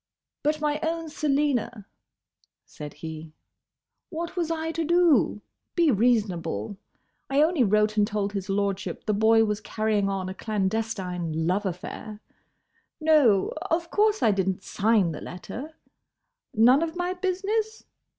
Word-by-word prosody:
"But, 305 +1 0
my 300 0 0
own 325 0 -2
Selina," 280 -7 0 0.8
said 150 -2 -9
he, 160 -1 -7 0.8
"what 340 0 -5
was 340 -3 -1
I 325 0 -2
to 330 0 -2
do? 330 -10 +3 0.3
Be 335 -4 +4
reasonable. 205 - 0 0.5
I 275 +2 +4
only 320 -4 +2
wrote 215 0 +2
and 205 -1 +4
told 205 -2 -2
his 195 -1 -4
lordship 195 -1 -2
the 215 - +1
boy 225 +2 +4
was 210 0 -2
carrying 215 -2 0
on 195 -1 -2
a 185 - -4
clandestine 190 -6 -2
love 190 +4 0
affair.—No, 215 - -1 0.2
of 335 0 -1
course 425 0 +2
I 220 - +5
did 190 -1 0
n't 190 0 -4
sign 210 -4 +2
the 150 - -7
letter.—None 260 - -2
of 330 0 -2
my 355 +1 -1
business? 400 +4 -2
225 Hz, 130 wpm, -26 LUFS, 195-320 Hz, 0.8 s, I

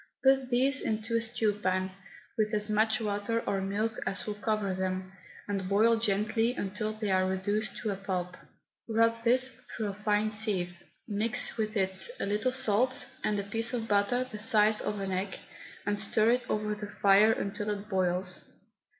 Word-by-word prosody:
Put 265 -1 +3
these 265 +3 +3
into 220 +1 -2
a 230 - +2
stew 225 -2 +1
pan, 185 -2 -1 0.4
with 215 0 0
as 210 +1 0
much 220 +1 +2
water 215 +1 -1
or 195 -1 -1
milk 210 +3 -2
as 190 0 -3
will 210 - -3
cover 210 -2 -1
them, 185 0 -3 0.4
and 195 -2 -3
boil 225 +3 +4
gently 225 +3 0
until 210 +1 -3
they 215 -2 -3
are 185 0 +2
reduced 205 +3 -2
to 215 - -1
a - - -2
pulp. 185 -2 -4 0.5
Rub 230 +1 +2
this 255 +2 +4
through 225 -3 -6
a - - -4
fine 210 +1 0
sieve, 185 -5 0 0.3
mix 220 +3 +3
with 215 -1 -2
it 190 - 0
a - - -1
little 210 +5 0
salt, 255 +2 +4 0.2
and 210 -1 0
a - - -2
piece 225 +4 0
of 225 -2 -3
butter 205 +5 +2
the 245 -4 -8
size 215 0 +3
of 210 -1 -3
an 195 -1 -3
egg, 190 +1 -3 0.5
and 205 0 +1
stir 215 +2 +3
it 250 +1 -1
over 210 0 -1
the 210 0 -6
fire 205 +1 +4
until 205 0 -3
it 205 0 -4
boils. 185 -2 0
210 Hz, 180 wpm, -29 LUFS, 195-225 Hz, 0.5 s, boil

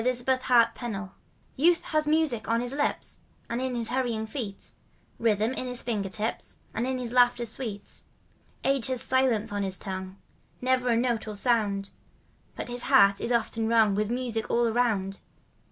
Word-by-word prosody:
» - - -4
Dorothy 250 0 +1
McFickar 250 -2 +3
YOUTH - - -15
AND 235 -3 -3
AGE 195 0 -6 0.5
Youth 335 +5 +4
has 310 -1 0
music 300 -7 +1
on 230 0 +2
his 245 +1 -3
h'ps 290 +1 -1 0.3
And 235 +2 -1
in 260 -1 -2
his 230 -2 -1
hurrying 240 -4 -1
feet, 220 -4 -6 0.5
Rhythm 220 +1 +1
in 255 - -3
his 250 -1 -1
finger 210 -5 -2
tips 215 +4 -3 0.2
And 235 +3 -1
in 260 0 -1
his 245 -2 -4
laughter 245 -1 +4
sweet. 220 -3 -5 0.6
Age 270 -2 +3
has 255 -2 0
silence 260 -6 +2
on 205 0 -2
his 190 -1 0
tongue 190 -1 -6 0.2
— - - -37
Never 255 0 +1
a 230 - +3
note 235 -2 0
or 215 - -5
sound; 205 -3 +1 0.6
But - - -5
his 245 0 -4
heart 200 -8 +6
is 240 - -1
often 230 -1 +1
wrung 225 -3 +4
By 210 +2 +1
music 235 -1 -2
all 240 0 +2
around. 220 -5 0
235 Hz, 185 wpm, -27 LUFS, 215-255 Hz, 0.6 s, heart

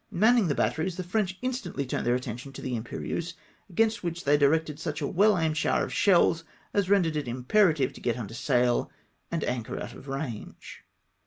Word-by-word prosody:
Manning 220 +1 +4
the 145 - 0
bat - - +1
teries, 165 +3 -2
the 185 - -4
French 190 0 -1
instantly 245 - -2
turned 125 - -2
their 120 - +3
attention 125 +1 -5
to - - -8
the 125 -2 -2
Imperieuse, 160 +9 -4 0.3
against 225 +4 +1
which 170 0 -3
they 145 +1 +4
directed 150 +1 +2
such 155 -2 -3
a 145 - -2
well 200 +6 +3
aimed 160 -2 0
shower - - +2
of - - -7
shells 170 -4 +4 0.3
as 200 -2 +1
rendered 180 -6 +3
it 150 -4 -2
imperative 135 - +2
to - - -12
get 120 -1 0
under 115 -3 -6
sail 125 -1 +1 0.4
and 165 -2 -2
anchor 120 -3 -3
out - - -6
of 140 - -12
rang;e. 135 -5 -5
160 Hz, 195 wpm, -28 LUFS, 130-185 Hz, 0.4 s, Manning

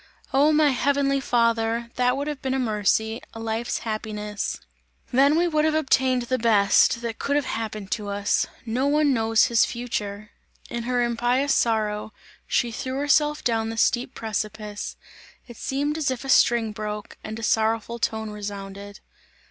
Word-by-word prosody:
Oh! 285 +3 +5
my 305 -1 +4
heavenly 275 +1 +1
Father! 230 -2 +1
That 250 +1 +2
would 285 - -2
have 295 -3 -4
been 265 0 -1
a - - +1
mercy, 220 -1 0
a - - -7
life's 225 +1 -2
happiness! 210 -2 -4 0.5
Then 280 +4 +5
we 350 +1 +3
would 310 -2 +1
have 310 0 +2
obtained, 260 -4 +2
the 255 +2 -1
best, 225 +1 +4
that 230 -1 -4
could 285 - 0
have 290 -2 +1
happened 215 -4 -4
to 210 -2 -2
us! 200 0 0 0.2
No 245 +4 0
one 295 -1 +3
knows 225 -2 +3
his 235 -2 +3
future!" 215 -4 -4 0.4
In 235 -1 -3
her 245 0 +1
impious 245 +4 +1
sorrow, 215 -2 0 0.3
she 240 -2 +1
threw 260 +3 -4
herself 295 +1 +2
down 225 -2 0
the 225 - -5
steep 245 +3 +1
precipice. 215 -1 -4 0.5
It 240 -2 -11
seemed 290 +3 -2
as 295 - +1
if 260 +1 -4
a - - -6
string 235 -3 +4
broke, 210 -1 -6
and 220 0 -6
a 230 - -7
sorrowful 225 +1 0
tone 220 -1 -2
resounded. 200 -1 -7
235 Hz, 165 wpm, -24 LUFS, 215-265 Hz, 0.5 s, Oh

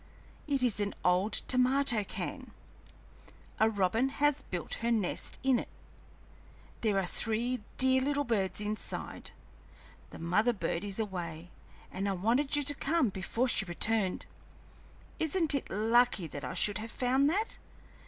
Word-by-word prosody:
It 275 -3 0
is 230 -5 +2
an 205 -1 -1
old 180 +4 +3 0.2
tomato 255 -3 +3
can; - - -6 1.1
a 220 - +5
robin 220 +5 +1
has 290 +1 +2
built 175 -3 -4
her 230 - 0
nest 215 -6 -1
in 260 -2 +3
it; - - -7 1.1
there 210 -4 +1
are 195 - +1
three 230 +6 0 0.2
dear 260 0 +5
little 285 +2 0
birds 205 -7 -1
inside; 210 +1 -4 0.8
the - - -11
mother 210 +9 +1
bird 170 -2 -3
is 200 +1 -4
away, 175 -5 -5 0.4
and 195 +2 -2
I - - +1
wanted 235 +10 +1
you 290 - +1
to 290 +1 +2
come 285 -2 +1
before 200 +6 -1
she 205 -5 +1
returned. 195 +2 +2 0.9
Isn't 320 0 +1
it 280 - -2
lucky 225 -1 +2
that 145 -2 -7
I 125 - -5
should 205 -1 +2
have 225 +1 -6
found 260 +4 +2
that? 415 +7 -1
225 Hz, 145 wpm, -31 LUFS, 195-260 Hz, 1.1 s, a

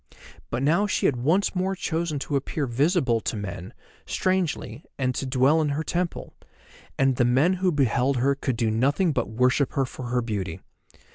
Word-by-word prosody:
But 120 +3 -2
now 170 +9 +3
she - - 0
had 130 - +2
once 160 +11 +1
more 190 +1 0
chosen 165 -3 -2
to 140 +1 -3
appear 140 +2 -1
visible 135 -1 +1
to - - -3
men, 95 -3 -6 0.4
strangely, 170 - -1
and 130 -2 0
to 135 - -3
dwell 135 +5 +3
in 150 - 0
her 145 +3 -1
temple; 175 +1 -3 0.6
and 135 -2 +2
the 125 - +3
men 130 +9 +3
who 185 -1 +3
beheld 135 -2 +1
her 135 +3 +2
could 135 -3 -3
do 115 -2 +1
nothing 140 - +2
but 125 -5 -1
worship 125 +4 +1
her 135 - +1
for 130 0 -8
her 125 0 0
beauty. 95 -6 -4
135 Hz, 185 wpm, -25 LUFS, 120-160 Hz, 0.6 s, now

